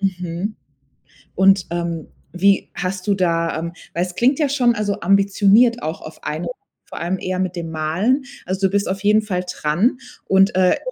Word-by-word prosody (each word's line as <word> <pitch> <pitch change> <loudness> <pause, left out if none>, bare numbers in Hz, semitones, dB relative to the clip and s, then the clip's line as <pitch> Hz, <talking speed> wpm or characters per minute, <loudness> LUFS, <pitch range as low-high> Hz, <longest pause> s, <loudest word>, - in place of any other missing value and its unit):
Mhm, 180 +1 -3 0.8
und, 190 -1 +4
ähm, 170 -2 -3 0.2
wie 195 +2 +2
hast 185 +1 -4
du 200 - +3
da 165 -3 0
ähm, 170 +1 -4 0.2
weil 170 - 0
es 180 -1 -9
klingt 260 +4 +2
ja 295 -3 +2
schon, 245 -4 +2
also, 205 -2 -2
ambitioniert 200 +5 +4
auch 160 +1 -4
auf 155 - -11
ein, 155 +3 -3 0.4
vor - - -9
allem 175 +3 -2
eher 185 0 -3
mit 185 -1 -2
dem 170 -2 -5
Malen. 175 - 0 0.2
Also 190 +1 +1
du - - -6
bist 200 0 0
auf 195 +1 -3
jeden 210 +1 +4
Fall 185 -4 -2
dran 180 - +1 0.3
und, 195 0 +3
äh, 185 -1 +4
190 Hz, 180 wpm, -20 LUFS, 170-205 Hz, 0.8 s, und